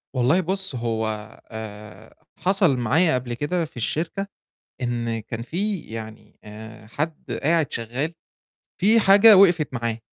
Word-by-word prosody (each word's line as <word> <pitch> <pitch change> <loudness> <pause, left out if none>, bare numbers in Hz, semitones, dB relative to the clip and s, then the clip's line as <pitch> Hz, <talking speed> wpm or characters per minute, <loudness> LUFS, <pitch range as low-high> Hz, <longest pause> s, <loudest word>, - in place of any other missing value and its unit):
والله 130 +8 +3
بُص، 190 -3 -2
هو 115 -2 -2 0.4
آآ 105 -1 -10 0.2
حصل 185 -7 +2
معايا 140 +7 +2
قبل 125 -1 -3
كده 160 +7 -1
في 150 - -16
الشركة 165 - -2 0.5
إن 120 -2 -2
كان 115 +1 -7
في 190 - -2
يعني 110 -4 -10
آآ 110 +1 -11
حد 155 +7 -5
قاعد 160 -1 +2
شغّال، 125 +8 -3 0.7
في 220 +5 +5
حاجة 205 +2 +7
وقفِت 175 -7 +4
معاه، 115 -2 -2
125 Hz, 130 wpm, -23 LUFS, 115-175 Hz, 0.7 s, حاجة